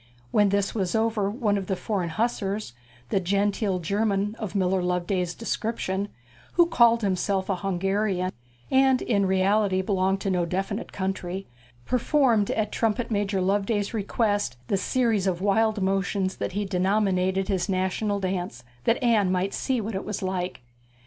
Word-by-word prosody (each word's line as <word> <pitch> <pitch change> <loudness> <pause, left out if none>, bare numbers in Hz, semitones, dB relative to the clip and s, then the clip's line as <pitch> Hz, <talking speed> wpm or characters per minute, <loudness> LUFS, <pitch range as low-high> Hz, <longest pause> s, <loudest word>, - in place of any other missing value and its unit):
When 205 -1 +4
this 200 0 0
was 190 -4 -1
over 220 -3 +1
one 210 -2 0
of 190 - -6
the 190 - 0
foreign 185 -3 -2
hussars 205 - -2 0.4
the - - +2
genteel 200 +1 0
German 200 +3 0
of 215 -3 -5
Miller 190 -1 +2
Loveday's 180 0 -1
description, 210 -4 -2 0.4
who 345 - +5
called 235 -8 +4
himself 190 0 0
a 190 - 0
Hungarian, 195 0 0 0.4
and 265 -1 +4
in 200 -4 +1
reality 190 0 +2
belonged 190 0 +1
to 195 - -1
no 180 -1 +1
definite 195 +5 -3
country 190 0 -3 0.4
performed 250 -4 +2
at 215 -1 -1
Trumpet 230 +1 0
major 200 -2 0
Loveday's 200 +2 0
request 205 - 0
the - - +2
series 220 -1 +1
of 180 -2 0
wild 210 +1 +2
motions 195 0 0
that - - -3
he 205 +1 -1
denominated 190 0 +1
his 190 -2 -1
national 190 +2 0
dance, 180 -10 -3 0.2
that 230 - +3
Anne 215 -6 +3
might 185 +2 0
see 260 -2 0
what 220 +1 -4
it 190 - -3
was 210 -2 -4
like. 185 -6 -3
195 Hz, 155 wpm, -26 LUFS, 185-215 Hz, 0.4 s, who